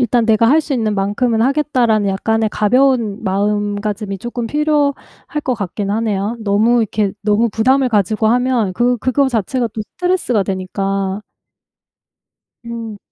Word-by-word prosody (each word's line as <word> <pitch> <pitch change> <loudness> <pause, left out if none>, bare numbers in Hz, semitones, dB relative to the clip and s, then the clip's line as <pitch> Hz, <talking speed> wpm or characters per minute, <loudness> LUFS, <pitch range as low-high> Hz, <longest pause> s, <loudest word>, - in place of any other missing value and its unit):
'일단 240 -1 +2
내가 225 +1 +4
할 310 +4 +5
수 295 - -5
있는 220 -3 0
만큼은 220 +4 0
하겠다.'라는 250 -7 +1
약간의 220 +3 0
가벼운 230 -1 +1
마음가짐이 205 0 -2
쪼끔 240 +2 -4
필요할 295 0 +1 0.5
것 255 - 0
같긴 200 -1 -4
하네요. 215 0 -1
너무 220 +3 +2
이렇게 210 -2 -1
너무 210 +3 +2
부담을 260 +5 +2
가지고 215 0 +1
하면 245 -4 +1
그 245 +4 +1
그거 265 +4 +1
자체가 240 +1 -1
또 215 - -5 0.2
스트레스가 355 - +1
되니까. 195 +1 -2 1.4
음. 230 -3 -6
225 Hz, 315 characters per minute, -17 LUFS, 205-250 Hz, 1.4 s, 할